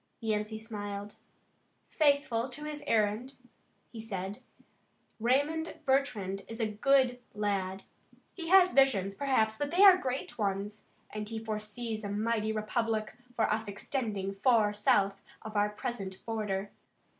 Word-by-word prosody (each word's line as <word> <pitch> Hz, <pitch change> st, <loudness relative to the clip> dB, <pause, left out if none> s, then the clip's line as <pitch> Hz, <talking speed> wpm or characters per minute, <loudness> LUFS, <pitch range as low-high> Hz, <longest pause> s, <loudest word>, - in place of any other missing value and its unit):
Yancey 215 Hz, -1 st, -1 dB
smiled. 205 Hz, -2 st, -6 dB, 0.7 s
"Faithful 280 Hz, -5 st, +2 dB
to 275 Hz, +5 st, -7 dB
his 300 Hz, -1 st, -5 dB
errand," 220 Hz, +5 st, +1 dB, 0.6 s
he 225 Hz, -, -7 dB
said. 195 Hz, -2 st, -5 dB, 0.8 s
"Raymond 285 Hz, +8 st, +1 dB
Bertrand 215 Hz, -8 st, 0 dB
is 225 Hz, +1 st, -7 dB
a 225 Hz, -, +2 dB
good 250 Hz, +3 st, +2 dB
lad. 195 Hz, -2 st, -1 dB, 0.5 s
He 340 Hz, -3 st, -6 dB
has 370 Hz, 0 st, +6 dB
visions, 210 Hz, -8 st, +4 dB
perhaps, 220 Hz, -4 st, +1 dB
but 290 Hz, 0 st, -1 dB
they 360 Hz, +6 st, +4 dB
are 385 Hz, -2 st, +10 dB
great 260 Hz, -7 st, -4 dB
ones, 205 Hz, +1 st, -2 dB, 0.3 s
and 210 Hz, 0 st, -5 dB
he 225 Hz, -, -4 dB
foresees 220 Hz, +1 st, -4 dB
a 205 Hz, -, -4 dB
mighty 215 Hz, +1 st, 0 dB
republic 220 Hz, 0 st, -1 dB, 0.2 s
for 225 Hz, -, +1 dB
us 220 Hz, 0 st, -2 dB
extending 205 Hz, -2 st, -3 dB
far 215 Hz, 0 st, +3 dB
south 200 Hz, -1 st, +2 dB, 0.2 s
of 220 Hz, 0 st, -8 dB
our 205 Hz, 0 st, +3 dB
present 205 Hz, -3 st, -5 dB
border. 205 Hz, -3 st, -2 dB
220 Hz, 135 wpm, -31 LUFS, 205-255 Hz, 0.8 s, are